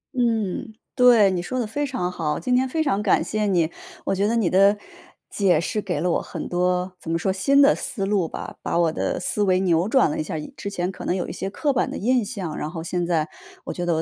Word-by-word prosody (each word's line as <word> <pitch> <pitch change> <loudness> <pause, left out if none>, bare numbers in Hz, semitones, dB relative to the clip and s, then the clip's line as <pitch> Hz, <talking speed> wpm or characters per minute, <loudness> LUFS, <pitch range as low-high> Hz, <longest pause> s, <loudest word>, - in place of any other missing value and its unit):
嗯， 225 -3 -1 0.2
对， 235 -6 +6
你 180 -2 -1
说 255 +8 -3
得 240 - 0
非 290 +7 -2
常 210 -9 -2
好。 150 -4 -2
今 250 +9 0
天 260 +1 +2
非 315 +4 0
常 235 -9 0
感 - - +3
谢 215 -1 -1
你， 170 -4 +2 0.3
我 - - 0
觉 195 +2 +1
得 230 - +1
你 220 -6 +2
的 195 +3 +4 0.5
解 195 -4 +3
释 210 +5 -1
给 190 -3 -2
了 180 0 +1
我 - - +1
很 - - -6
多 180 +1 0
怎 165 - -7
么 165 - +2
说， 190 +3 0
新 275 +9 +4
的 285 - +6
思 195 -5 -3
路 195 -4 +1
吧， - - -7
把 - - -1
我 170 -2 +3
的 - - -2
思 210 - -1
维 185 -2 +3
扭 175 +1 +2
转 245 - +4
了 - - -3
一 - - +1
下 155 - -4
儿， - - -2
以 150 - -9
之 200 - -5
前 180 -2 -2
可 - - -10
能 180 - 0
有 185 - -2
一 - - -5
些 195 - -4
刻 285 +7 -1
板 250 - +1
的 - - -5
印 245 +2 +2
象， 195 -8 -4
然 150 - -3
后 165 -1 -6
现 175 +1 -2
在 160 -3 +1 0.4
我 - - -5
觉 175 -1 -4
得 170 - +2
我 160 - 0
195 Hz, 285 characters per minute, -23 LUFS, 175-225 Hz, 0.5 s, 对